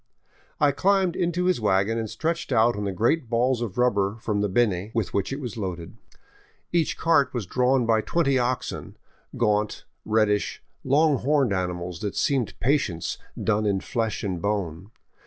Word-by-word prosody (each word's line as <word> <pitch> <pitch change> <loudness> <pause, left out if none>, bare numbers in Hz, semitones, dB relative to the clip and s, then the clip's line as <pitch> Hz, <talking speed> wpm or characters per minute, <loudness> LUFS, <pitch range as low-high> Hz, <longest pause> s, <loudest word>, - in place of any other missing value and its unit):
I 145 -1 +4
climbed 190 +3 +2
into 175 0 0
his 180 -9 +1
wagon 105 +2 +2
and 110 -1 -3
stretched 160 +8 -3
out 120 0 +4
on 105 0 -3
the 100 - -1
great 120 - +1
balls 120 +1 +1
of 110 -6 -4
rubber 100 -4 +1
from 105 -2 -1
the 105 - 0
Beni 100 -2 +1
with 110 -6 -1
which 100 +3 -1
it 135 - -3
was 120 -6 -6
loaded. 90 -5 -5 0.8
Each 170 -3 +1
cart 160 -6 +2
was 115 -5 -2
drawn 125 +5 +2
by 110 -1 +3
twenty 140 -1 +1
oxen, 125 +1 -3 0.4
gaunt, 105 0 0 0.2
reddish, 105 -2 +1 0.2
long 145 +2 +3
horned 135 -5 +2
animals 90 -2 -3
that 100 -2 -4
seemed 135 -6 0
Patience 120 - 0 0.2
done 105 -1 +1
in 100 -1 +1
flesh 115 +2 -2
and 90 -4 -3
bone. 100 -3 -2
115 Hz, 165 wpm, -25 LUFS, 100-135 Hz, 0.8 s, I